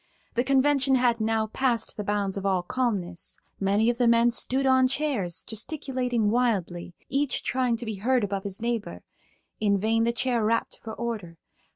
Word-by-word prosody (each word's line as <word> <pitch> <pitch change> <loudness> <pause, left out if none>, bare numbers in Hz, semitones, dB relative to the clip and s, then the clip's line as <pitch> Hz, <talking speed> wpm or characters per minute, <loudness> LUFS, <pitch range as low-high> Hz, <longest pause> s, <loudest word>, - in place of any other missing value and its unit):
The 240 - +1
convention 275 0 +3
had 240 -3 +2
now 220 0 +1
passed 235 +1 -1
the 210 - -4
bounds 200 -1 -1
of 195 - -4
all 190 -2 +1
calmness. 190 -6 -3 0.2
Many 200 +3 +2
of 240 0 +1
the 245 - +3
men 235 +1 +4
stood 260 +3 +1
on 260 -1 +5
chairs, 255 - -1
gesticulating 245 -2 -1
wildly, 185 -8 -1
each 275 +1 0
trying 250 -2 0
to 240 - -5
be 220 -2 -4
heard 245 +4 +1
above 200 -1 -2
his 200 -2 -4
neighbor. 235 -2 -3 0.6
In 205 -2 +2
vain 225 +3 +1
the 235 - +2
Chair 240 -1 0
rapped 230 +2 0
for 220 - -6
order. 215 -8 -5
230 Hz, 175 wpm, -26 LUFS, 205-255 Hz, 0.6 s, on